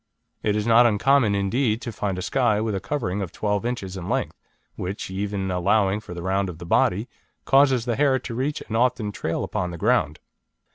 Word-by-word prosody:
It 105 -1 0
is 105 -1 -1
not 120 +1 +6
uncommon, 115 0 +3
indeed, 110 +3 +1
to 120 - -4
find 100 -3 -3
a 90 - -4
Skye 120 -4 +1
with 110 0 -1
a 95 - -1
covering 105 -5 -2
of 95 - -4
12 105 -1 -1
inches 100 -7 -4
in 95 0 -6
length, 135 +2 -1 0.4
which, 95 +1 -5
even 95 0 -2
allowing 95 +3 +2
for 100 -5 -10
the 85 - -6
round 95 +1 0
of 85 - -8
the 85 - -9
body, 95 +6 +2 0.4
causes 135 -3 +4
the 120 -2 0
hair 140 -2 +3
to 125 - -7
reach 135 +5 -2
and 110 - -6
often 120 -3 +1
to - - -12
trail 80 - -1
upon 90 - -2
the 85 - -7
ground. 75 -1 +1
105 Hz, 210 wpm, -24 LUFS, 95-120 Hz, 0.4 s, not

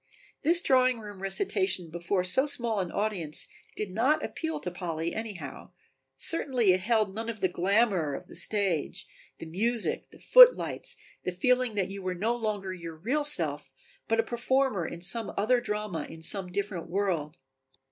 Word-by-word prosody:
This 340 +4 +4
drawing 255 -4 +3
room 205 -3 -10
recitation 195 - 0
before 175 +2 -1
so 260 +10 +2
small 235 -6 0
an 180 -3 -2
audience 195 -8 -1 0.3
did 210 -3 -4
not 265 +10 +1
appeal 320 0 -4
to 180 - -4
Polly 170 -2 -4
anyhow, 195 -11 -7 0.4
certainly 255 - +2
it 185 - +1
held 215 0 +1
none 225 +2 -4
of 225 -2 -5
the 190 - +2
glamour 185 -4 +1
of - - -8
the - - -15
stage, 195 -8 0 0.3
the - - -8
music, 220 +8 -1
the - - -16
footlights, - - +6 0.3
the 180 - -2
feeling 250 +5 +1
that 195 -2 -1
you 195 0 -7
were 185 -1 -3
no 220 +7 0
longer 210 -5 -3
your 170 -3 -8
real 250 - -1
self 150 - +3 0.4
but 225 0 +1
a - - +4
performer 240 -5 0
in 170 - -8
some 220 +4 0
other 240 +4 +2
drama 210 -6 -3
in 160 0 -11
some 185 +1 -1
different 190 -3 -4
world. 175 -5 -1
200 Hz, 165 wpm, -28 LUFS, 180-235 Hz, 0.4 s, footlights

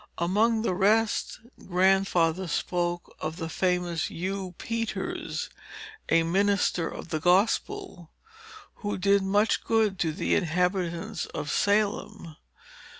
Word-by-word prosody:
Among 220 +6 +2
the 225 - +1
rest, 210 +4 +1 0.3
Grandfather 185 -1 +2
spoke 175 +1 -2
of 155 +1 -4
the 165 -3 -4
famous 180 -2 0
Hugh 185 +1 -4
Peters, 230 -1 -3 0.6
a 165 0 +4
minister 190 -1 +1
of - - -8
the 155 - -1
gospel, 195 - +1 0.7
who 205 -2 -3
did 200 +1 +3
much 205 +3 +2
good 215 -4 +1
to 160 - +1
the 160 - -1
inhabitants 180 -1 -1
of 150 - -5
Salem. 205 -4 0
185 Hz, 110 wpm, -27 LUFS, 170-205 Hz, 0.7 s, a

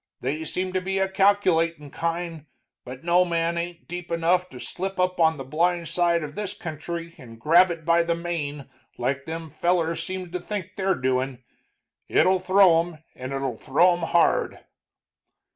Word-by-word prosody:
They 145 +5 -2
seem 185 +4 -3
to 185 - 0
be 190 +1 -2
a 190 0 +2
calculatin' 180 -6 +2
kind, 165 -2 -3 0.4
but 125 +4 -9
no 175 +1 +4
man 170 -1 0
ain't 170 0 -5
deep 175 0 -6
anough 175 +2 +1
to 125 - -11
slip 190 +6 -5
up 180 0 +1
on 160 -1 +4
the 135 - -5
blind 170 +4 0
side 170 -1 +2
of 150 -1 -6
this 205 +2 -4
country 170 -2 -6
and 115 -3 -12
grab 170 +8 +5
it 165 -2 -5
by 170 0 +4
the 170 0 0
mane 155 -5 -4 0.3
like 130 +3 -2
them 160 -1 -6
fellers 170 +1 0
seems 185 -2 -6
to 180 - -3
think 190 0 -5
they're 190 -1 +1
doin'. 130 0 -1 0.6
It'll 185 0 +3
throw 185 -2 +5
'em, 165 -2 -5
and 130 +1 -7
it'll 135 -4 -3
throw 175 +7 +4
'em 175 - -3
hard." 170 - +2
170 Hz, 175 wpm, -25 LUFS, 155-180 Hz, 0.6 s, grab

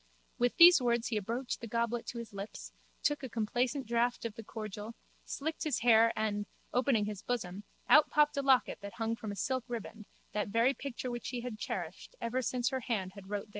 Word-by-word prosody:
With 245 0 +2
these 345 -3 +10
words 235 -1 +1
he 225 - 0
approached 235 +5 -3
the 230 - -5
goblet 235 +1 -1
to 240 - -5
his 235 -3 -7
lips, 200 +2 -7 0.3
took 295 -1 +1
a 260 - -5
complacent 245 +5 -1
draught 235 +1 0
of 230 - -3
the 225 +1 -9
cordial, 215 +1 -7 0.3
slicked 315 +3 -3
his 300 -7 0
hair 230 -1 +6
and, 210 -1 -1 0.3
opening 245 -4 +3
his 210 -2 -5
bosom, 205 -5 -3 0.2
out 305 - +7
popped 300 0 +3
a 280 - +1
locket 270 -2 +3
that 200 0 -7
hung 225 0 -1
from 215 -2 -6
a - - -5
silk 260 +4 -1
riband, 225 -3 -6 0.2
that 210 -1 -1
very 230 +6 +3
picture 260 -2 -5
which 240 0 -5
he 245 -2 -3
had 235 -3 -6
cherished - - -5
ever 250 +3 -1
since 245 0 0
her 265 -1 -2
hand 210 -6 -2
had 195 -1 -12
wrote 205 -1 -1
therein. 210 - -16
235 Hz, 210 wpm, -32 LUFS, 215-255 Hz, 0.3 s, these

